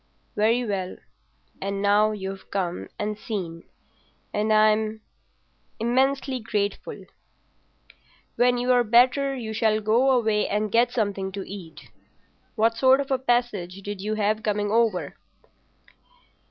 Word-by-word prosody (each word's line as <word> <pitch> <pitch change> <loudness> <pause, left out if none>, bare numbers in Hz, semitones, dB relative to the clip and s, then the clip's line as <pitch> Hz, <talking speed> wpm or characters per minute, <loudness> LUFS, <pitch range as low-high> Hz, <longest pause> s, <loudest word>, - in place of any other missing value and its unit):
"Very 230 +4 +2
well. 190 -4 -3 0.6
And 195 0 -3
now 205 +1 +3
you've 195 -2 -6
come 180 -3 -3
and 210 0 -3
seen, 175 -8 -5 0.7
and 210 +1 0
I'm—immensely 220 +4 -1
grateful. 210 -3 -3 1.3
When 245 0 +3
you're 245 0 +3
better 255 +4 +3
you 225 -4 -5
shall 220 -1 +2
go 225 +5 +2
away 220 -5 +2
and 210 0 -1
get 235 +2 +3
something 200 -4 -2
to 195 -1 -6
eat. 170 -7 -10 0.6
What 225 0 +2
sort 260 +2 +5
of 280 0 -3
a 265 - +2
passage 230 -7 -1
did 205 -1 -5
you 215 +2 -2
have 215 +1 0
coming 205 -1 -1
over?" 225 -5 +1
215 Hz, 120 wpm, -25 LUFS, 205-240 Hz, 1.3 s, sort